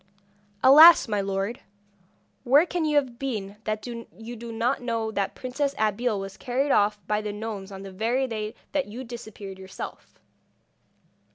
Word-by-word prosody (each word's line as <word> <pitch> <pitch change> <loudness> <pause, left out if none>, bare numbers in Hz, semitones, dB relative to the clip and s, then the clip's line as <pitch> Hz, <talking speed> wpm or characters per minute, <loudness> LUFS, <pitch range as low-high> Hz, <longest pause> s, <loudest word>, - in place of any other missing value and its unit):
'Alas! 310 +5 +9
my 210 -2 0
lord, 195 +3 -2 0.8
where 280 +7 +5
can 350 -2 -2
you 300 -1 +1
have 260 -5 +1
been 210 -7 -4
that 215 0 -2
you 230 -1 -8
do 235 0 -8
not 235 +4 0
know 230 -2 -2
that 200 -2 -2
the - - -18
Princess 275 +2 -2
Abeille 215 +1 0
was 195 0 -7
carried 270 +3 -1
off 210 +1 +3
by 210 0 0
the 210 -1 -4
gnomes 205 -2 -6
on 195 0 -8
the 195 - -8
very 230 +7 0
day 215 -3 -4 0.2
that 285 -5 0
you 235 +5 -7
disappeared 215 -5 -9
yourself? 190 0 -9
225 Hz, 165 wpm, -26 LUFS, 205-255 Hz, 0.8 s, Alas